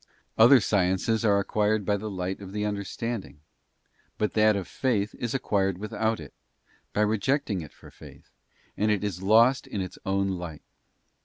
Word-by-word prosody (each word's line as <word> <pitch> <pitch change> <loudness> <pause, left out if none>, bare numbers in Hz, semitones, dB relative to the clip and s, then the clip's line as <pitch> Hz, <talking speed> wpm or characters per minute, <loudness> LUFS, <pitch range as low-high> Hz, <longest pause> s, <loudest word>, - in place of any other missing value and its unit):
Other 125 +4 +7
sciences 105 +2 +1
are 100 -2 +4
acquired 105 +1 0
by 105 - +2
the 105 +2 -4
light 95 -1 -4
of 100 -1 -10
the 105 0 -2
understanding, 105 -2 -4 0.8
but 105 - -1
that 110 -1 +4
of 95 -3 -3
faith 105 0 -1
is 120 +1 -2
acquired 95 -7 0
without 110 +2 -2
it, 75 -3 -10 0.6
by 105 - 0
rejecting 110 - 0
it 80 - -10
for - - -16
faith, - - -15 0.4
and 105 +1 +1
it 105 -1 +1
is 95 -3 -3
lost 115 +6 +4
in 100 - -4
its 95 -1 -5
own 100 0 0
light. 85 -5 -6
105 Hz, 165 wpm, -27 LUFS, 95-110 Hz, 0.8 s, Other